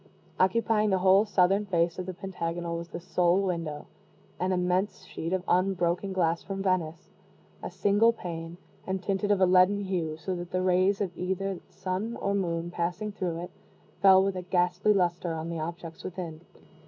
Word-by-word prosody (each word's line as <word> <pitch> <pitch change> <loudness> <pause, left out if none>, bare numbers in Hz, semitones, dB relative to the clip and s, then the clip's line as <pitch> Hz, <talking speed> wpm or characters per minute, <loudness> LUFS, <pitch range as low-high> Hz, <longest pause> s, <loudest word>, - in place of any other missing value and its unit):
Occupying 215 +2 +2
the 190 - +3
whole 190 +3 +5
southern 200 0 +2
face 170 -1 +1
of 185 - -4
the 185 - -4
pentagonal 170 -2 -4
was 170 0 -5
the 170 - -7
sole 180 0 +2
window 170 -6 -3 0.5
an 185 +2 0
immense 180 +2 0
sheet 165 - -5
of 185 -1 0
unbroken 180 0 +1
glass 170 -3 +1
from 195 -1 -5
Venice 175 -3 -1 0.5
a - - -5
single 205 +3 +3
pane, 170 -5 -7 0.3
and 190 0 -2
tinted 195 +1 -1
of 205 -2 +3
a - - +7
leaden 185 +2 +4
hue, 175 -5 -2
so 185 +3 -4
that 175 0 -6
the 185 0 -1
rays 185 +2 +3
of 180 -3 -2
either 190 +2 -2
the 180 - -10
sun 195 +5 -3
or 200 - 0
moon 170 -3 -1
passing 180 +5 -2
through 175 -4 -3
it, 180 - -8 0.5
fell 190 -1 +7
with 195 -1 0
a 185 - -3
ghastly 180 +2 +1
luster 175 -3 +1
on 160 +1 -4
the 170 -1 -3
objects 165 +1 -6
within. 170 -3 -6
185 Hz, 180 wpm, -28 LUFS, 170-195 Hz, 0.5 s, a